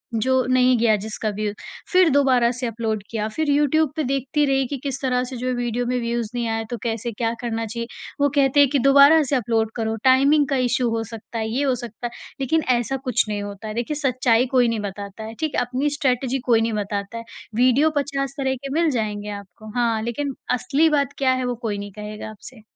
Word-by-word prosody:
जो 255 +3 +2
नहीं 255 -1 +4
गया 225 -2 +4
जिसका 215 0 -3
व्यू, 210 0 -3 0.4
फिर 365 -3 +5
दोबारा 260 -4 +4
से 250 0 -4
अपलोड 220 -2 -2
किया। 215 -2 -2
फिर 310 +6 -2
यूट्यूब 295 +1 +2
पे 310 - -1
देखती 275 +3 0
रही 270 -1 +2
कि 280 - -4
किस 275 -1 -3
तरह 250 -1 +1
से 255 0 -6
जो 250 - -3
है 255 - +1
वीडियो 245 0 -1
में 250 0 0
व्यूज़ 235 -2 -2
नहीं 235 -1 -1
आए, 225 0 -2
तो 240 - -3
कैसे 230 0 -2
क्या 225 +1 -1
करना 225 -1 -2
चाहिए, 235 +1 -5 0.3
वो 285 - +4
कहते 275 0 +3
हैं 285 - +6
कि 280 0 +1
दोबारा 280 +4 +7
से 275 +1 0
अपलोड 225 -2 0
करो, 225 -1 -1
टाइमिंग 275 +3 +5
का 275 - +1
इश्यू 245 0 +1
हो 225 0 -1
सकता 230 +1 -8
है, 220 0 -2
ये 265 +5 0
हो 265 -2 +2
सकता 240 0 -6
है - - -10 0.3
लेकिन 315 +4 +1
ऐसा 240 +3 -2
कुछ - - +2
नहीं 205 -1 -2
होता 205 +1 -7
है। 215 - -4
देखिए, 240 +6 -2
सच्चाई 255 -4 +2
कोई 245 -2 +5
नहीं 230 -2 -1
बताता 200 +1 -6
है, 220 - -7
ठीक 310 -2 -2
है? - - +2
अपनी 255 +4 -1
स्ट्रैटिजी 260 -1 0
कोई 230 -3 +4
नहीं 225 0 0
बताता 205 +1 -3
है, 230 - -6 0.3
वीडियो 255 +6 +4
50 275 -1 -1
तरह 265 -1 0
के - - -3
मिल 335 - +3
जाएँगे 210 -1 -3
आपको, 200 +2 -13
हाँ, 230 -2 +1
लेकिन 270 +4 -3 0.2
असली 290 +7 +2
बात 285 -2 +1
क्या 265 -2 +2
है - - -1
वो 245 - -1
कोई 205 -2 -2
नहीं 205 0 -6
कहेगा 210 +1 -7
आपसे। 215 +3 -13
245 Hz, 230 wpm, -22 LUFS, 225-275 Hz, 0.4 s, दोबारा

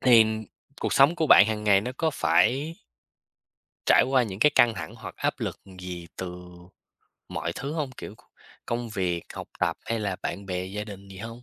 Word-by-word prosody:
thì 120 -3 +7 0.6
cuộc - - -1
sống 140 +5 +6
của 160 - +1
bạn 105 -7 +8
hàng 105 -1 -2
ngày 100 -2 +5
nó 125 +5 -4
có 160 -1 +2
phải 145 +2 +2 1.1
trải - - +6
qua 130 -1 +3
những 100 -3 -6
cái 150 - +6
căng 120 -1 +6
thẳng - - -7
hoặc - - -9
áp - - 0
lực - - -4 0.2
gì 90 -2 -7
từ 90 -1 -7 0.8
mọi 80 - -3
thứ 140 - -5
hông? 150 -4 -2
Kiểu, 125 - -9
c - - -26 0.5
công 120 0 -2
việc, 90 -5 -2
học - - -7
tập - - +1
hay 115 - -2
là 100 -3 -2
bạn 100 - -4
bè, 90 -1 -2
gia 105 +3 -5
đình 100 -2 -10
gì 95 -1 -11
hông? 115 +3 -8
105 Hz, 200 wpm, -26 LUFS, 95-125 Hz, 1.1 s, bạn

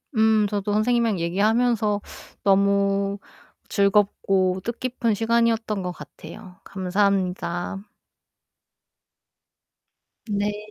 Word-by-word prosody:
음 220 -1 +3
저도 205 0 -2
선생님이랑 225 -2 +1
얘기하면서 210 +4 +1 0.4
너무 200 0 +2 0.5
즐겁고 195 -2 +2
뜻깊은 235 -1 -2
시간이었던 225 -2 +1
것 180 - -3
같아요. 180 +1 -12
감사합니다. 190 -1 -1 2.4
네. 210 +1 -3
205 Hz, 200 characters per minute, -23 LUFS, 195-220 Hz, 2.4 s, 음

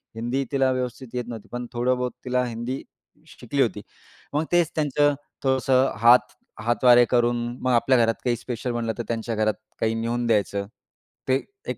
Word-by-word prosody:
हिंदी 120 +4 -1
तिला 135 -2 +2
व्यवस्थित 125 0 -3
येत 125 -1 -2
नव्हती. 115 -3 -8
पण 120 0 -4
थोडं 125 +1 +1
बहुत 125 0 -2
तिला 125 0 +1
हिंदी 120 +3 -4 0.5
शि - - -15
शिकली - - -1
होती. - - 0 0.5
मग 150 +2 +1
तेच 175 -2 +3
त्यांचं 145 -1 +2 0.3
थोडंसं 130 0 +3 0.7
हातवारे 120 +1 +5
करून 120 -1 +3 0.2
मग 130 - +1
आपल्या 125 +2 +4
घरात 115 -1 +3
काही 120 -1 +1
स्पेशल 120 +1 -4
बनलं 115 -1 -2
तर 120 - -3
त्यांच्या 115 0 -2
घरात 110 0 +1 0.3
काही 110 0 +1
नेऊन 120 +1 -1
द्यायचं. 100 -2 +1 0.6
ते 130 +1 +2 0.2
एक - - -3
120 Hz, 170 wpm, -24 LUFS, 115-130 Hz, 0.7 s, हातवारे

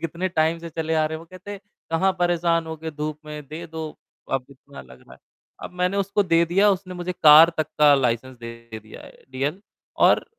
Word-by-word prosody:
कितने 170 +3 -2
टाइम 160 -1 +1
से 170 0 -8
चले 160 0 -2
आ 155 -1 +2
रहे, 160 +1 -4
वो 165 - -12
कहते, 185 +4 -10 0.3
"कहाँ 190 +4 +2
परेशान 170 -1 +1
होगे 160 0 -6
धूप 150 0 -5
में, 150 0 -8
दे 165 +3 -7
दो।" 160 -1 -6 0.4
अब 135 -1 0
इतना 140 +1 -13
लग 65 -1 -16
रहा - - -19
है, - - -22 0.4
अब - - -7
मैंने 180 +2 +1
उसको 200 +1 +1
दे 170 -3 +3
दिया 195 +5 +3
उसने 185 -1 -3
मुझे 180 0 -4
कार 160 -1 +8
तक 155 -1 0
का 150 -1 +7
लाइसेंस 130 -1 -1
दे 115 -1 -9
दिया 110 - -13
है - - -16
डीएल। 140 +8 -3 0.5
और - - +3
160 Hz, 210 wpm, -23 LUFS, 150-175 Hz, 0.5 s, कार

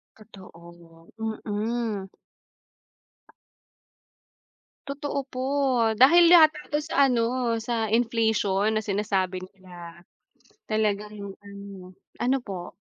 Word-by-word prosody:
Totoo, 170 -5 -16 0.4
mm. 215 -1 -3 2.8
Totoo 280 0 -4
po, 255 - -6 0.5
dahil 270 +10 +6
yata 320 -2 +7
ito 295 0 -2
sa 295 -2 +2
ano 240 -1 0
sa 225 -2 -2
inflation 220 -3 +1
na 215 - 0
sinasabi 195 -3 -1
nila, 175 -3 -13 0.7
talaga 210 -1 0
yung 200 -1 -8
ano. 200 -2 -11 0.2
Ano 255 +2 +1
po? 185 -5 -7
210 Hz, 90 wpm, -25 LUFS, 190-240 Hz, 2.8 s, yata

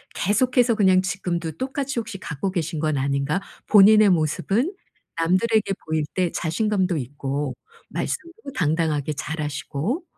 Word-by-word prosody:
계속해서 245 +3 +2
그냥 190 -3 +4
지금도 175 -3 -2
똑같이 265 - -3
혹시 220 -3 -6
갖고 170 +3 -3
계신 165 -3 -2
건 155 -1 0
아닌가? 140 +6 0 0.3
본인의 210 0 +7
모습은 195 - +1 0.4
남들에게 195 +7 +2 0.2
보일 155 -1 0
때 180 -3 +1
자신감도 185 +2 0
있고 140 +1 -3 0.3
말씀도 335 -3 -5
당당하게 155 -3 0
잘하시고 150 - -3
180 Hz, 305 characters per minute, -23 LUFS, 155-215 Hz, 0.4 s, 본인의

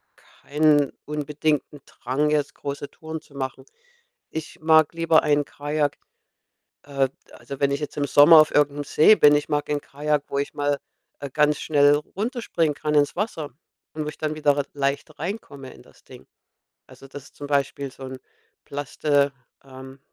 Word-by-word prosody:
keinen 150 -1 +1
unbedingten 150 0 -2
Drang, 140 +5 -2
jetzt 145 -1 0
große 140 0 -6
Touren 160 0 -8
zu 140 - -21
machen. 130 0 -5 0.7
Ich 160 0 -7
mag 160 -1 +4
lieber 165 -1 +3
ein 145 -1 +2
Kajak 145 0 -2 0.9
äh, 135 -2 0 0.2
also, 140 -1 -10
wenn 140 -1 +2
ich 140 +1 -1
jetzt 150 - -6
im 145 - 0
Sommer 155 +2 +8
auf 155 - +1
irgend 145 -1 +3
'nem 145 0 -4
See 155 +9 +5
bin, 150 -5 +6
ich 145 - -1
mag 145 0 -1
ein 145 0 0
Kajak, 150 0 -2
wo 140 - -2
ich 140 +3 -3
mal, 145 -1 0 0.4
äh, 140 - -6
ganz 150 +2 +2
schnell 145 -1 +4
runterspringen 180 - -2
kann, 150 +1 -2
ins 145 -1 +2
Wasser, 170 - -3 0.4
und 155 -1 -4
wo - - -6
ich - - -11
dann 155 0 -2
wieder 145 -2 +1
r 140 - 0
leicht 140 +1 -3
reinkomme 145 - -6
in - - -17
das - - -23
Ding. - - -15 0.6
Also, 135 - -15
das 140 0 -10
ist - - -19
zum 145 - -8
Beispiel 140 -1 -1
so 135 - -13
'n 130 0 -7 0.5
Plastik 145 0 0 0.3
ähm, 130 0 -12
145 Hz, 175 wpm, -23 LUFS, 140-155 Hz, 0.9 s, Sommer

